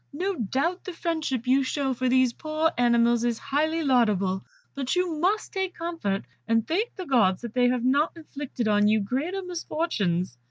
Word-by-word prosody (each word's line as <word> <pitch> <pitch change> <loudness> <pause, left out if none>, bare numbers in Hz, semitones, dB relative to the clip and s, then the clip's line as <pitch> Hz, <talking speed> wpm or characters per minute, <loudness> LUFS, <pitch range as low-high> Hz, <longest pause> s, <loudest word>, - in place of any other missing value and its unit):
No 375 +7 -1
doubt 280 - -1
the 370 - -6
friendship 315 -8 -2
you 260 +2 +4
show 270 0 -1
for 255 +1 -1
these 255 -1 +3
poor 310 +3 0
animals 235 -1 +3
is 240 -2 0
highly 310 +5 0
laudable, 210 -8 +2 0.3
but 275 +2 -2
you 355 -4 0
must 390 +6 0
take 380 -2 -2
comfort, 330 - -2 0.2
and 225 -1 +2
thank 415 +9 -1
the 370 - -6
Gods 225 - +2
that 235 -2 -6
they 250 -1 +3
have 250 -1 0
not 285 +5 +2
inflicted 285 -6 -5
on 210 -1 +4
you 215 +1 +4
greater 290 - -2
misfortunes." 220 - -2
265 Hz, 175 wpm, -26 LUFS, 235-330 Hz, 0.3 s, you